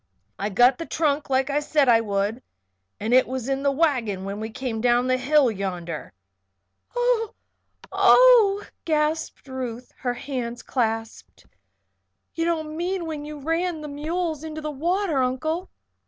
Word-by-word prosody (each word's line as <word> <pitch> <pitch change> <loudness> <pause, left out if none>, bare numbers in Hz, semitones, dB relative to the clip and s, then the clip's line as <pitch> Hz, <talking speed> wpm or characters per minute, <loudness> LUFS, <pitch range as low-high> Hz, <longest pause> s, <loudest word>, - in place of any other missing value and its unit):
"I 200 - -1
got 245 +5 +4
the 330 - -5
trunk 300 -2 0
like 265 +1 +1
I 290 - +2
said 295 -1 +2
I 230 -2 +6
would 205 +2 -1 0.6
and 220 +3 -1
it 255 0 +5
was 255 -1 -4
in 270 0 -1
the 280 - +2
wagon 255 - 0
when 200 +1 -4
we 220 +1 -4
came 225 -1 -4
down 245 +1 +3
the 255 0 +2
hill 270 0 +3
yonder. 180 -5 -5 0.8
"Oh, 485 -3 +1 0.6
oh!" 455 -5 +6 0.2
gasped 310 -1 -1
Ruth, 250 -2 -6
her 245 -1 -2
hands 245 -2 -5
clasped. 225 - -3 0.9
"You 330 - -1
don't 315 -2 -2
mean 355 +1 -2
when 305 -2 -5
you 300 0 -7
ran 330 +3 -1
the 300 - -6
mules 315 +2 -3
into 315 -1 -6
the 305 0 -4
water, 335 +1 0
Uncle?" 315 +8 -1
275 Hz, 155 wpm, -24 LUFS, 240-320 Hz, 0.9 s, I